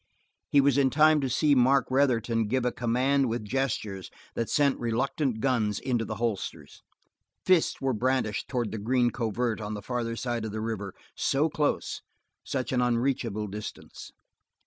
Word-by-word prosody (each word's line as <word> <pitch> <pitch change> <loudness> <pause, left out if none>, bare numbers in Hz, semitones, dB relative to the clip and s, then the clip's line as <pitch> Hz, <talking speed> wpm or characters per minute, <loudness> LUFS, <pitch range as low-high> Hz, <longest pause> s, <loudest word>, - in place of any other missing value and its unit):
He 140 - +5
was 140 0 +3
in 135 -1 +4
time 155 +2 +4
to 135 - -1
see 145 +4 +3
Mark 130 0 +4
Retherton 115 -5 +2
give 125 +3 0
a 125 - +2
command 125 +3 +1
with 115 -1 -3
gestures 105 -5 -2 0.2
that 115 - -2
sent 140 -2 +2
reluctant 125 +1 -1
guns 115 -6 +1
into 120 -4 -1
the 110 - -4
holsters. 110 -3 -4 0.6
Fists 185 -3 +3
were 135 -1 0
brandished 125 -2 0
toward 120 -4 -2
the 110 - -4
green 120 +3 +2
covert 115 -1 -2
on 105 0 -4
the 105 - -6
farther 120 0 -2
side 120 -1 -3
of 110 - -4
the 110 - -3
river, 110 -3 -4 0.2
so 145 +4 +1
close, 150 -1 -1 0.4
such 130 -2 -3
an 125 -1 +2
unreachable 120 -3 0
distance. 105 +1 -8
120 Hz, 165 wpm, -28 LUFS, 110-135 Hz, 0.6 s, He